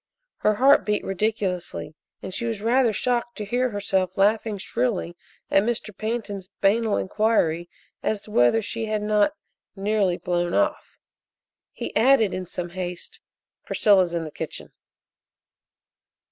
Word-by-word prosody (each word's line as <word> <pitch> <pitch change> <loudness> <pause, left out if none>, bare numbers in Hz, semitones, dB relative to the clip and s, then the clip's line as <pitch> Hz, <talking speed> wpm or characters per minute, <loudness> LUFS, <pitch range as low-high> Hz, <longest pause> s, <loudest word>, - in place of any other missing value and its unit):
Her 210 0 +2
heart 270 +2 +5
beat 210 +1 0
ridiculously 195 -4 -2 0.3
and 190 - -6
she 235 - -2
was 225 -3 -2
rather 235 +2 +3
shocked 240 +2 -1
to 210 - -4
hear 250 +4 0
herself 190 -3 -1
laughing 210 +1 +2
shrilly 195 -3 -2 0.4
at 195 - +5
Mr. 215 -2 -2
Pantin's 210 -4 -4
banal 215 +2 +2
inquiry 185 -5 +1 0.3
as 215 - 0
to 210 - -14
whether 165 - +4
she 225 +2 -3
had 215 -1 -1
not 210 +6 +2 0.4
"nearly 195 -2 +1
blown 175 -1 -1
off." 305 0 0 0.7
He - - -6
added 225 -3 +4
in 185 -1 -4
some 175 0 -5
haste: 180 -1 -6 0.4
"Priscilla's 185 -5 +3
in 170 - -1
the 155 - -7
kitchen." - - -7
210 Hz, 135 wpm, -24 LUFS, 185-225 Hz, 0.7 s, heart